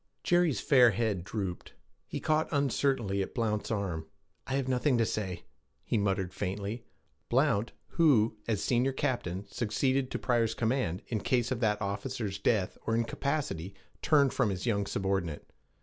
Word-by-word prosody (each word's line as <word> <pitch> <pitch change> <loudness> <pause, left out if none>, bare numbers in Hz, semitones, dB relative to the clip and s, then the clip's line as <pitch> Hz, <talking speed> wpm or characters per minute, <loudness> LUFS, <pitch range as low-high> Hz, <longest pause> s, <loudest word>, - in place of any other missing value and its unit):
Jerry's 175 -5 +3
fair 125 -5 +6
head 105 -4 -1
drooped; 95 -3 -5 0.3
he - - -4
caught 155 0 +1
uncertainly 135 -8 +1
at 95 - -5
Blount's 110 -4 -1
arm. 95 -8 -2 0.4
'I 130 - -3
have 135 -2 0
nothing 130 +1 +2
to 115 - +3
say,' 95 -6 -3 0.4
he - - -2
muttered 95 -3 0
faintly. 100 +4 -3 0.5
Blount, 105 +4 +2 0.2
who, 125 -10 +4
as 110 -4 0
senior 130 +2 +2
captain, 100 -8 -2
succeeded 130 +5 0
to - - -2
Pryor's 115 -3 +1
command 115 -6 0
in 110 - 0
case 125 +2 +1
of 125 - -1
that 105 -3 +1
officer's 100 0 -3
death 100 -5 +1
or 115 - +2
incapacity, 115 - -2 0.3
turned 140 -4 +4
from 125 -5 +2
his 95 +1 -3
young 100 -4 +1
subordinate. 95 -6 -2
115 Hz, 150 wpm, -30 LUFS, 100-130 Hz, 0.5 s, fair